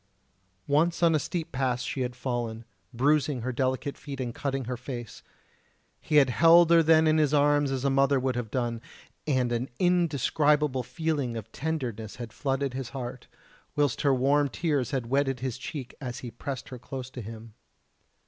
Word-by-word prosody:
Once 165 +4 +2
on 165 -1 +5
a 155 - +3
steep 165 +1 -4
pass 125 -2 -1
she 130 +4 -3
had 125 -1 -2
fallen, 120 -3 -3 0.3
bruising 140 +1 +1
her 130 +3 -2
delicate 130 +2 -1
feet 140 -2 -8
and 120 -2 -3
cutting 135 -1 -3
her 125 +2 -3
face. 120 -2 -7 0.8
He 155 - -2
had 135 -4 +6
held 165 +6 +6
her 170 -1 +7
then 160 0 +5
in 155 0 +4
his 150 -1 +3
arms 145 0 +3
as 135 0 -2
a 140 - +3
mother 135 0 +3
would 130 -1 -1
have 120 -3 -3
done, 120 -1 -2 0.5
and 130 -4 +1
an 120 +2 -1
indescribable 150 -5 +2
feeling 145 -4 -2
of 110 0 -8
tenderness 125 -8 -4
had 120 -3 -8
flooded 135 -1 -1
his 130 -2 -4
heart, 125 -1 -7 0.5
whilst 145 -4 +1
her 140 - +3
warm 140 +2 +3
tears 145 -4 -1
had 130 -4 -2
wetted 135 0 0
his 130 -1 -3
cheek 130 -2 -6
as 125 -3 -5
he 120 - -6
pressed 130 +2 -6
her 125 - -8
close 130 +1 -7
to 125 - -7
him. 110 +1 -9
135 Hz, 180 wpm, -28 LUFS, 125-145 Hz, 0.8 s, her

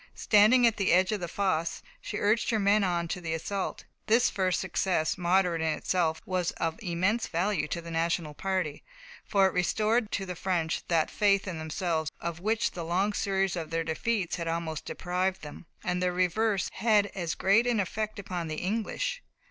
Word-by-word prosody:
Standing 220 +4 +5
at 230 -2 +3
the 195 -2 +1
edge 185 +3 +4
of 210 - -1
the 175 - -4
fosse, 170 -3 -1 0.2
she - - -5
urged 215 +3 +2
her 225 - +2
men 205 0 +3
on 175 -2 0
to 180 - -3
the 160 -1 -2
assault. 195 +4 -3 0.2
This 230 +3 +4
first 185 -2 0
success, 175 -5 0
moderate 180 -2 +2
in 160 - 0
itself, 165 -3 0
was 185 -2 0
of 165 +5 -3
immense 190 +4 0
value 175 -2 0
to 170 - -3
the 170 0 -9
National 165 -1 -1
party, 185 -3 -2 0.4
for 195 -2 +4
it 190 - +1
restored 215 +5 +1
to 195 - -1
the 180 -1 -5
French 170 -3 -1
that 165 -2 +1
faith 200 -2 +2
in 175 -3 -4
themselves 160 0 -2
of 170 -1 -4
which 220 +4 0
the 170 - -6
long 185 +5 0
series 195 -2 0
of 165 -3 -4
their 165 0 -1
defeats 180 +4 -1
had 170 -1 -4
almost 165 -1 -3
deprived 185 +1 -2
them. 150 +3 -10 0.2
And 180 -3 -1
their 180 0 +2
reverse 190 +3 +1
had 210 -1 +2
as 175 -4 -3
great 220 +5 +3
an 235 -3 +2
effect 215 +3 -2
upon 180 -4 -4
the 155 - -3
English. 230 - -2
185 Hz, 190 wpm, -29 LUFS, 170-205 Hz, 0.4 s, Standing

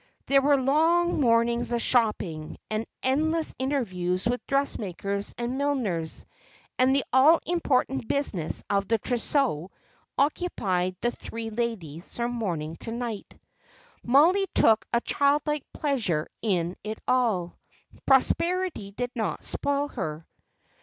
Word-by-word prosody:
There 275 0 +4
were 285 0 +4
long 325 +6 +3
mornings 235 -1 +2
of 240 - +1
shopping, 210 -11 0
and 215 +1 -2 0.2
endless 315 +5 +1
interviews 185 -10 -1
with 245 +1 0
dressmakers 200 -7 -2
and 240 +3 -3
milliners; 220 - -1 0.5
and 260 +1 +4
the 275 - +2
all 290 +6 +6
important 270 -7 0
business 200 - -2
of 200 -1 0
the 225 - +2
trousseau 240 - 0 0.5
occupied 195 - 0
the 240 - +1
three 225 -1 -7
ladies 205 -8 -4
from 240 0 -1
morning 170 -9 -3
to 225 - -5
night. 235 -3 -5 0.6
Mollie 335 +10 +4
took 220 -1 +4
a 235 - +2
child 285 +3 +2
like 300 -2 -3
pleasure 225 - 0
in 180 -5 0
it 215 +1 -4
all. 220 -9 +1 0.5
Prosperity 335 - +2
did 245 +5 -4
not 225 -4 -3
spoil 285 0 -1
her. 155 - -5
240 Hz, 125 wpm, -26 LUFS, 200-280 Hz, 0.6 s, all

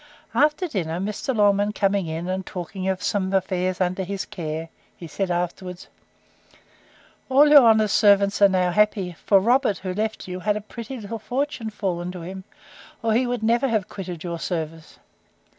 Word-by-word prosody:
After 305 +5 +2
dinner, 170 - -3
Mr. 210 +6 -3
Longman 205 0 +3
coming 195 -3 +1
in, 165 +2 -4
and 185 +1 -2
talking 185 +1 -6
of 190 -1 -1
some 190 -2 0
affairs 185 -1 0
under 185 +1 0
his 195 +1 -4
care, 160 -1 -5 0.3
he 170 - -9
said 190 +4 -3
afterwards, 175 +1 -4 1.4
All 280 +3 +6
your 295 -1 +9
honour's 220 -3 +4
servants 200 -1 +4
are 200 - +8
now 185 -1 +1
happy; 200 -3 +1
for 195 - +6
Robert, 240 +1 +2
who 185 -1 -5
left 215 +1 -3
you, 180 0 -5
had 210 +2 0
a - - -5
pretty 235 +4 -8
little 220 +1 -6
fortune 255 0 -3
fallen 180 -4 -3
to 180 - -7
him, 190 +2 -8 0.6
or 225 -1 +2
he 245 +3 +2
never 240 +2 +1
would - - -3
have 210 -4 0
quitted 180 -4 -7
your 170 -2 -4
service. 160 -2 -5
195 Hz, 175 wpm, -23 LUFS, 180-220 Hz, 1.4 s, your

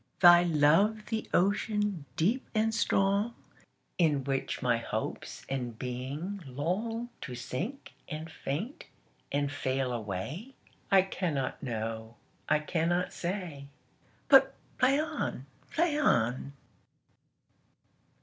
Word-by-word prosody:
Thy 175 -1 +9
love 175 +7 +3
the 220 -1 -2
ocean, 205 -2 +1
deep 225 +11 +1
and 220 +1 +2
strong, 205 +1 +2 0.6
In 150 -5 +3
which 135 0 -2
my 120 -2 +3
hopes 115 - -4
and 125 -4 -3
being 135 - -4
longTo 180 - -3
sink 170 - -5 0.2
and 155 +1 -5
faint 170 - -4 0.5
and 145 0 0
fail 130 -2 -1
away?I 140 - -1
cannot 165 -8 -2
know. 110 -2 -4 0.3
I 155 - +5
cannot 170 +3 0
say. 170 -6 -4 0.6
But 270 -1 +7 0.2
play, 265 +3 +4 0.7
play 320 -2 +1
on. 125 - +2
165 Hz, 95 wpm, -30 LUFS, 135-210 Hz, 0.7 s, Thy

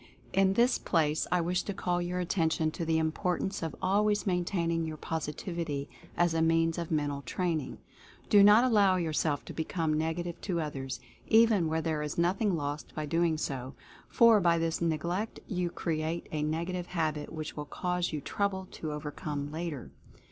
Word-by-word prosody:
In 195 0 +4
this 240 +5 +3
place 155 -3 +1
I 180 - +3
wish 180 +2 0
to 200 - -5
call 175 -2 0
your 175 +1 -2
attention 165 -3 +1
to 165 - -4
the 160 0 +2
importance 180 +5 -1
of 160 -3 -3
always 205 +2 +2
maintaining 175 -3 0
your 160 -1 -4
Positivity 160 -1 -3 0.3
as 175 -1 +3
a 165 - +1
means 165 0 +2
of 170 - -4
Mental 145 -3 -1
Training. 165 -1 -2 0.5
Do 205 - +6
not 210 +4 +8
allow 205 -6 +4
yourself 155 -4 0
to - - -8
become 160 -1 -1
negative 165 +2 -2
to 180 -4 -1
others, 135 -4 -4 0.3
even 220 -6 +5
where 160 +1 0
there 155 -2 -1
is 150 0 -4
nothing 185 +3 +2
lost 145 -1 -4
by 155 - -2
so 150 - -6
doing, 165 0 +2 0.7
for 230 -2 +6
by 170 -3 +3
this 165 0 -1
neglect 170 +6 -1
you 180 -3 -1
cre 170 - -3
ate 165 +2 -3
a 155 - -2
negative 170 +4 -2
habit 155 -4 -2
which 155 -1 -5
will 150 - -5
cause 180 +3 -2
you 150 -2 -3
trouble 190 +3 -2
to 155 - -5
overcome 150 -1 -4
later. 155 -5 -5
165 Hz, 175 wpm, -30 LUFS, 155-180 Hz, 0.7 s, not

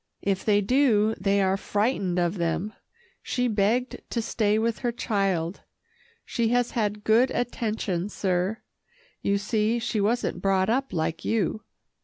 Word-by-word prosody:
If 195 -1 0
they 205 -1 +3
do, 220 -2 +3
they 200 0 +2
are 190 0 +2
frightened 205 -3 0
of 175 +1 0
them. 170 +5 -1 0.5
She 250 -1 -1
begged 225 +4 0
to 235 - -1
stay 215 -2 +1
with 225 +1 0
her 240 -2 -1
child. 195 -7 -1 0.6
She 235 -2 0
has 245 +1 +1
had 210 -2 -1
good 230 +5 +4
attention, 215 -7 -2
sir. 190 +2 -1 0.6
You 200 0 +1
see 215 +2 0
she 225 -2 -1
wasn't 230 +4 0
brought 195 +1 +2
up 270 +3 0
like 165 0 -2
you." 215 -1 0
Mr. - - -50
210 Hz, 150 wpm, -26 LUFS, 195-230 Hz, 0.6 s, good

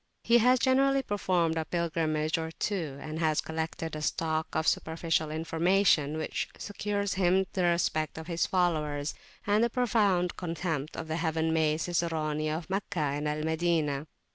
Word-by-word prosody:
He 235 +1 +5
has 250 +3 +5
generally 270 +2 +3
performed 180 -6 0
a 160 - -2
pilgrimage 160 -2 0
or 160 0 -3
two, 165 -5 -3
and 155 +2 -6
has 155 -2 +2
collected 160 0 -3
a 155 - -5
stock 160 0 -1
of 160 0 0
superficial 160 -1 0
information 165 -1 +2
which 155 - -3
secures 205 0 -2
for 190 - -3
him 185 +2 +3
the 185 -2 +1
respect 165 -3 +1
of 160 - -6
his 170 0 0
followers, 155 -5 0 0.3
and 210 +2 +3
the 235 - +2
profound 205 -8 +1
contempt 165 -4 -3
of 160 - -5
the 160 0 -2
heaven 160 -1 0
made 155 0 +2
Ciceroni 155 -3 -1
of 160 +1 -3
Meccah 195 0 -3 0.2
and 145 +1 -2
Al 150 0 -2
Madinah. 160 -3 0
165 Hz, 165 wpm, -29 LUFS, 155-185 Hz, 0.3 s, He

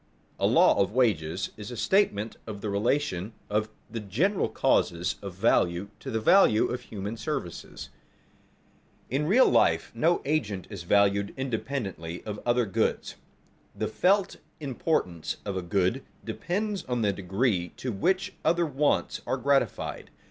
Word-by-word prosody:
A - - +3
law - - +5
of 100 +1 0
wages 95 -8 +1
is 105 -1 -7
a 120 - -7
statement 115 - +1
of 105 -2 -6
the 105 - -3
relation 105 -2 0 0.2
of 105 +1 +1 0.2
the 115 - -5
general 140 - 0
causes 85 +1 +1
of 100 -3 -7
value 95 -2 +2
to - - -7
the 110 - -1
value 110 - +5
of 125 0 -3
human 105 -2 -6
services. - - -5 1.2
In 145 +4 0
real 240 +9 +6
life - - +3
no 170 +2 +3
one - - -3
agent 110 - -1
is 100 -4 -6
valued 100 0 +3
independently 115 -10 -4
of 105 -1 -5
other 120 0 +3
goods. 95 - -1 0.6
The - - -2
felt 195 +1 +2 0.2
importance 130 - -1
of 100 -2 -3
a 95 - -1
good 95 +8 0 0.2
depends 200 +1 -2
on 125 -2 -1
the 100 -1 +2
degree 95 -1 0
to 130 - -3
which 185 - 0
other 170 0 +3
wants 145 -1 0
are - - 0
gratified. 140 +2 0
110 Hz, 150 wpm, -27 LUFS, 100-140 Hz, 1.2 s, real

